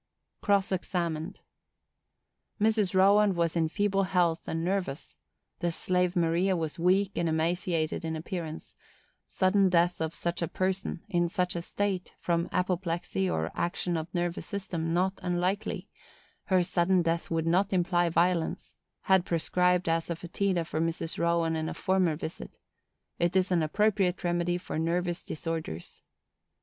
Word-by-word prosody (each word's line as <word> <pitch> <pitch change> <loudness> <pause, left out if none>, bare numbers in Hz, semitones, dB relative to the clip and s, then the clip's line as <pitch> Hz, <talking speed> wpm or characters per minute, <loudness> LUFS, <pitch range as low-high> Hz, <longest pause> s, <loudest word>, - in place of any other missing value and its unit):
Cross 200 0 +2
examined.—Mrs. 190 +4 -4
Rowand 200 +1 +5
was 170 -1 0
in 165 -1 +2
feeble 200 +2 +1
health, 175 -3 +1
and 165 0 -2
nervous; 180 -6 -2 0.4
the 175 - 0
slave 180 +2 0
Maria 175 +2 +2
was 160 0 -3
weak 190 +3 +3
and 170 -1 0
emaciated 165 0 0
in 160 0 -2
appearance; 160 0 -6 0.5
sudden 190 0 +3
death 175 -1 +2
of 160 0 -2
such 170 0 -2
a 170 - 0
person, 185 0 -2
in 175 -4 +1
such 180 -1 -1
a 170 - -2
state, 190 +1 -3
from 170 0 0
apoplexy 175 - -1
or 80 0 -1
action 175 0 -1
of 165 +1 -4
nervous 175 -1 -2
system, 175 -5 -3
not 185 +3 +1
unlikely; 180 +3 -1 0.6
her 185 -2 +3
sudden 175 +1 +2
death 165 0 -1
would 165 -1 0
not 185 +4 +2
imply 175 -2 +2
violence; 170 0 0 0.3
had 190 -2 +4
prescribed 180 +1 +1
asafœtida 170 +2 -1
for 155 - -2
Mrs. 165 0 -2
Rowand 170 -1 +1
on 160 0 -2
a - - -5
former 185 -4 +1
visit; 160 +1 -7 0.6
it 175 +1 +1
is 190 0 +2
an 175 -2 +3
appropriate 195 +2 +1
remedy 175 0 +1
for 175 - -4
nervous 175 +1 -1
disorders. 160 - -5
175 Hz, 140 wpm, -29 LUFS, 165-185 Hz, 0.6 s, Rowand